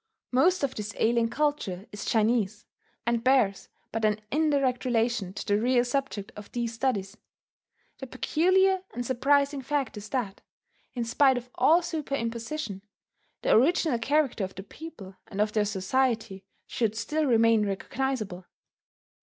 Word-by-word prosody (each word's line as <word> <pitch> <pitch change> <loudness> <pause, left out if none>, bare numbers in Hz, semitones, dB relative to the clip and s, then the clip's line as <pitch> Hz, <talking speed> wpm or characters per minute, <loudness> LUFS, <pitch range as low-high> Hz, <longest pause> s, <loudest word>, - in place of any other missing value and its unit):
Most 325 +7 +3
of 275 - 0
this 210 -1 -6
alien 230 0 +2
culture 240 -10 -1
is 205 -1 -7
Chinese, 215 -2 +1 0.4
and 235 0 0
bears 255 -7 +2 0.2
but 225 0 -3
an 215 0 +2
indirect 280 -4 +1
relation 230 -5 0
to - - -6
the 205 +1 +1
real 245 0 +3
subject 245 -6 -3
of 210 -1 -11
these 235 -1 -2
studies. 220 -5 -2 0.8
The 265 - -6
peculiar 370 +8 +2
and 245 0 -3
surprising 280 +3 +2
fact 280 -1 -2
is 210 +1 -8
that, 235 -8 -3 0.5
in 240 - -1
spite 265 +3 +4
of 245 0 -7
all 335 +3 +4
superimposition, 235 - -3 0.6
the - - +2
original 280 0 +3
character 275 -3 +1
of 190 - -5
the 190 - -7
people 200 -6 -11
and 195 - -7
of 210 0 +2
their 210 -1 +2
society 210 0 -1 0.2
should 220 -3 -1
still 300 +8 -1
remain 225 -3 +4
recognizable. 205 -2 -3
235 Hz, 145 wpm, -27 LUFS, 210-275 Hz, 0.8 s, spite